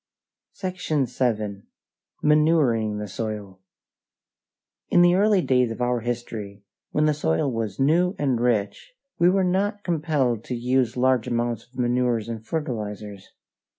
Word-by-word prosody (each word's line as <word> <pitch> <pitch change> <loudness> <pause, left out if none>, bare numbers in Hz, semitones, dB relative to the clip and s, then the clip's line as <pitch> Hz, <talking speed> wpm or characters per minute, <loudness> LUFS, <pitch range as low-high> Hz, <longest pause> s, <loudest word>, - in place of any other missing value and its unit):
SECTION 180 -7 -1
VII. 110 -5 -2 0.6
MANURING 150 -9 +3
THE 105 0 -4
SOIL 105 -2 -5 1.3
In 175 - +5
the 175 0 +5
early 200 0 +3
days 125 -2 +2
of 115 - -6
our 125 0 +1
history, 110 -4 -5 0.3
when 150 - +1
the 155 - +3
soil 135 - 0
was 110 -4 -3
new 170 +7 +3
and 135 -5 0
rich, 120 - -1 0.3
we 170 +1 +5
were 190 +1 +2
not 200 +3 0
compelled 145 - 0
to 125 - -3
use 125 0 0
large 130 -2 +2
amounts 120 -1 -2
of 125 - -20
manures 120 -2 +1
and 115 -2 -6
fertilizers. 105 - -5
125 Hz, 135 wpm, -24 LUFS, 110-155 Hz, 1.3 s, In